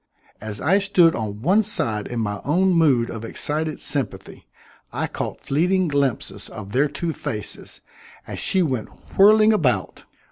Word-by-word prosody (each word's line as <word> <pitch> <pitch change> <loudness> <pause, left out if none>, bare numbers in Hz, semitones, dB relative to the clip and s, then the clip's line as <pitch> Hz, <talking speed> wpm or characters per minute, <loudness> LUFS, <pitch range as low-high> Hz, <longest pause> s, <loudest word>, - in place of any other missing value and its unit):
As 110 -1 -6
I 195 - +3
stood 190 -5 +4
on 105 -1 -5
one 195 +8 +4
side 110 - -1
in 120 - -4
my 105 -2 -3
own 185 +7 +2
mood 140 -9 +3
of 110 -1 -7
excited 155 +6 -3
sympathy, 120 -9 -3 0.4
I - - -2
caught - - -5
fleeting 180 +5 +1
glimpses 140 -4 -2
of 100 -2 -9
their 135 +6 +2
two 160 +3 -4
faces, 105 -6 -5 0.4
as - - -7
she 190 -2 +2
went 130 -8 -2 0.3
whirling 215 +2 +6
about. 150 - 0
145 Hz, 150 wpm, -22 LUFS, 115-185 Hz, 0.4 s, whirling